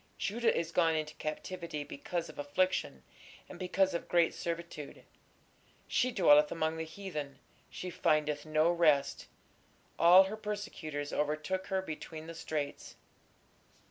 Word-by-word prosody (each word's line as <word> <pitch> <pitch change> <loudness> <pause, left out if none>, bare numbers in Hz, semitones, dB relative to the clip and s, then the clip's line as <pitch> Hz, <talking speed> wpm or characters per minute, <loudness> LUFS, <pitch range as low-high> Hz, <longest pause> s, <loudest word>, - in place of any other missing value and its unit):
Judah 230 +4 +1
is 165 0 -2
gone 165 -2 +3
into 155 -1 -2
captivity 160 0 -4
because 170 +4 -4
of - - -12
affliction, 145 - 0 0.4
and 175 - -11
because 185 +1 +1
of 170 - -3
great 170 -1 +3
servitude: 170 -4 -6 0.8
she 255 0 +1
dwelleth 150 -8 +5
among 160 0 -1
the 160 - -2
heathen, 160 -5 -6 0.3
she 180 - -6
findeth 150 -4 +1
no 155 +2 +2
rest: 155 -5 +2 0.7
all 180 +3 +9
her 195 +3 -4
persecutors 205 -9 -5
overtook 155 +6 -1
her 190 -1 -1
between 160 -1 -7
the 165 - -7
straits.... 155 -3 -4
165 Hz, 130 wpm, -32 LUFS, 150-185 Hz, 0.8 s, all